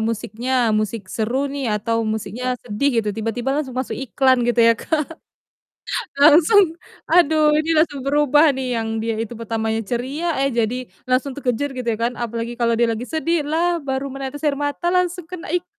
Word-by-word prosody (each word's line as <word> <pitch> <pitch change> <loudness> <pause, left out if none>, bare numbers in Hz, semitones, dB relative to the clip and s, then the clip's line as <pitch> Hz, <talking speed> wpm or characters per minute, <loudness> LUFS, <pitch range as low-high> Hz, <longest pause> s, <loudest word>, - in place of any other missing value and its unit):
musiknya 230 +2 0
musik 215 0 -1
seru 235 +5 -1
nih 275 -3 -2
atau 230 +2 -1
musiknya 225 +3 -2
sedih 235 +4 0
gitu, 220 -2 +1
tiba-tiba 225 +5 -2
langsung 270 -4 -3
masuk 260 - -2
iklan 260 0 +2
gitu 240 0 0
ya, 230 - +7
Kak, 305 +6 -1 1.2
langsung 325 +4 +6 0.3
aduh, 310 -3 +4
ini 310 +1 0
langsung 305 -4 +1
berubah 295 +2 +4
nih, 255 -2 -2
yang 225 0 -2
dia 225 0 -2
itu 225 +1 -4
pertamanya 225 -1 -2
ceria, 265 - -2
eh, 275 - 0
jadi 235 +1 0 0.3
langsung 255 +2 +1
terkejer, 270 +1 -2
gitu 250 -2 -5
ya 225 - +1
kan, 235 +2 -1
apalagi 235 0 -3
kalau 230 -1 +2
dia 235 - +3
lagi 235 +3 -5
sedih, 320 -1 -1
"Lah, 340 +2 +1
baru 270 -1 -3
menetes 275 +2 -6
air 290 -1 0
mata 290 +5 -1
langsung 360 -1 0
kena 355 0 -9
iklan" 350 +2 -1
260 Hz, 175 wpm, -21 LUFS, 230-300 Hz, 1.2 s, ya